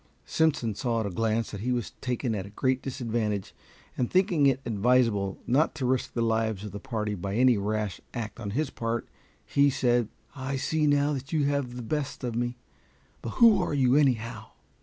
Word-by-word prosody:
Simpson 150 Hz, -9 st, +1 dB
saw 115 Hz, +2 st, -1 dB
at -, -, -2 dB
a 100 Hz, -, -3 dB
glance 110 Hz, +3 st, 0 dB
that 100 Hz, -, -6 dB
he 125 Hz, +3 st, -1 dB
was 120 Hz, -2 st, -1 dB
taken 125 Hz, -1 st, -1 dB
at 100 Hz, -2 st, -3 dB
a -, -, -10 dB
great 130 Hz, +5 st, 0 dB
disadvantage, 115 Hz, -6 st, -2 dB, 0.4 s
and 125 Hz, -, -1 dB
thinking 180 Hz, -6 st, +3 dB
it 135 Hz, -1 st, +2 dB
advisable 110 Hz, -3 st, +2 dB
not 145 Hz, +7 st, +2 dB
to 140 Hz, -4 st, -2 dB
risk 130 Hz, 0 st, 0 dB
the 115 Hz, -, 0 dB
lives 110 Hz, -3 st, 0 dB
of 105 Hz, -, -6 dB
the 100 Hz, -, -6 dB
party 110 Hz, -3 st, -3 dB
by 100 Hz, +1 st, -4 dB
any 125 Hz, +1 st, +5 dB
rash 105 Hz, -1 st, -2 dB
act 115 Hz, -1 st, -5 dB
on 105 Hz, -4 st, -4 dB
his 135 Hz, +7 st, -1 dB
part, 115 Hz, 0 st, -3 dB, 0.4 s
he 140 Hz, 0 st, +3 dB
said, 120 Hz, -4 st, +2 dB, 0.3 s
"I 135 Hz, 0 st, -3 dB
see 155 Hz, +3 st, +1 dB
now 145 Hz, 0 st, +3 dB
that 135 Hz, -1 st, -5 dB
you 155 Hz, -3 st, +2 dB
have 140 Hz, -3 st, -1 dB
the 125 Hz, -, -5 dB
best 145 Hz, +3 st, -3 dB
of 120 Hz, -2 st, -2 dB
me; 120 Hz, +1 st, -1 dB, 0.6 s
but 115 Hz, -, -5 dB
who 230 Hz, -3 st, +6 dB
are -, -, -1 dB
you, 130 Hz, -2 st, +3 dB
anyhow?" 115 Hz, -6 st, +1 dB
120 Hz, 200 wpm, -28 LUFS, 110-135 Hz, 0.6 s, who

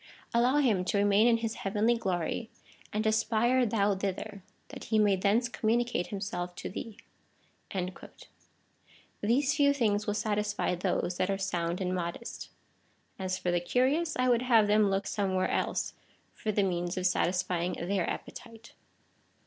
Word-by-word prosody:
Allow 245 Hz, +3 st, +3 dB
him 225 Hz, -11 st, +3 dB
to 200 Hz, -, 0 dB
remain 205 Hz, +2 st, +4 dB
in 235 Hz, -1 st, +4 dB
his 225 Hz, -1 st, -3 dB
heavenly 210 Hz, +4 st, +2 dB
glory, 190 Hz, +1 st, -2 dB, 0.4 s
and 215 Hz, +1 st, -1 dB
aspire 225 Hz, +3 st, +2 dB
thou 205 Hz, -2 st, +2 dB
thither,^ 200 Hz, +1 st, -4 dB, 0.3 s
that -, -, -9 dB
he 220 Hz, -, +1 dB
may 205 Hz, -2 st, +4 dB
thence 205 Hz, +6 st, +2 dB
communicate 235 Hz, -4 st, 0 dB
himself 180 Hz, -3 st, -4 dB
to -, -, -6 dB
thee." 215 Hz, +2 st, -7 dB, 2.2 s
These 260 Hz, +7 st, +2 dB
few 285 Hz, -2 st, +4 dB
things 210 Hz, -6 st, 0 dB
will 205 Hz, -, 0 dB
satisfy 210 Hz, -2 st, -1 dB
those 180 Hz, 0 st, -1 dB
that 185 Hz, -, 0 dB
are 195 Hz, -, 0 dB
sound 180 Hz, -2 st, -2 dB
and 185 Hz, 0 st, -1 dB
modest. 175 Hz, +5 st, -5 dB, 0.7 s
As 185 Hz, -1 st, -2 dB
for 180 Hz, -, -1 dB
the 175 Hz, -, +2 dB
curious, 270 Hz, -, +1 dB
I 255 Hz, 0 st, +2 dB
would 240 Hz, -1 st, +3 dB
have 235 Hz, -4 st, +4 dB
them 210 Hz, 0 st, +4 dB
look 195 Hz, +1 st, 0 dB
some 200 Hz, -2 st, -1 dB
where 185 Hz, 0 st, +1 dB
else -, -, -1 dB, 0.4 s
for 215 Hz, -, -3 dB
the 205 Hz, -1 st, +1 dB
means 175 Hz, -1 st, -1 dB
of 185 Hz, -, -1 dB
satisfying 180 Hz, -1 st, +1 dB
their 185 Hz, +1 st, -1 dB
appetite. 230 Hz, -1 st, -8 dB
205 Hz, 155 wpm, -30 LUFS, 185-230 Hz, 2.2 s, remain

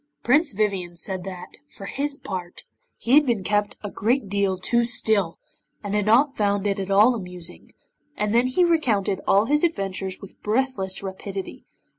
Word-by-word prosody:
Prince 295 Hz, +4 st, +3 dB
Vivien 190 Hz, -4 st, -2 dB
said 185 Hz, +1 st, -4 dB
that, 180 Hz, -2 st, -9 dB
for 195 Hz, -, -11 dB
his 280 Hz, +5 st, -2 dB
part, 180 Hz, -7 st, -7 dB, 0.3 s
he 235 Hz, -, -4 dB
had 295 Hz, +2 st, +7 dB
been 235 Hz, -8 st, -1 dB
kept 205 Hz, +1 st, 0 dB
a 205 Hz, -, -5 dB
great 230 Hz, +1 st, 0 dB
deal 200 Hz, -1 st, 0 dB
too 235 Hz, +6 st, +1 dB
still, 220 Hz, -7 st, +3 dB, 0.5 s
and 205 Hz, -1 st, -4 dB
had 210 Hz, -1 st, 0 dB
not 265 Hz, +6 st, +4 dB
found 205 Hz, -1 st, 0 dB
it 200 Hz, 0 st, 0 dB
at 195 Hz, 0 st, -4 dB
all 210 Hz, +5 st, +5 dB
amusing, 180 Hz, -5 st, -7 dB, 0.5 s
and 210 Hz, 0 st, 0 dB
then 240 Hz, +2 st, +3 dB
he 265 Hz, +8 st, +2 dB
recounted 220 Hz, -, +1 dB
all 200 Hz, +2 st, +4 dB
his 295 Hz, +5 st, +1 dB
adventures 195 Hz, -, -2 dB
with 195 Hz, -, -14 dB
breathless 210 Hz, -5 st, -1 dB
rapidity. 195 Hz, 0 st, -7 dB
205 Hz, 170 wpm, -23 LUFS, 190-240 Hz, 0.5 s, had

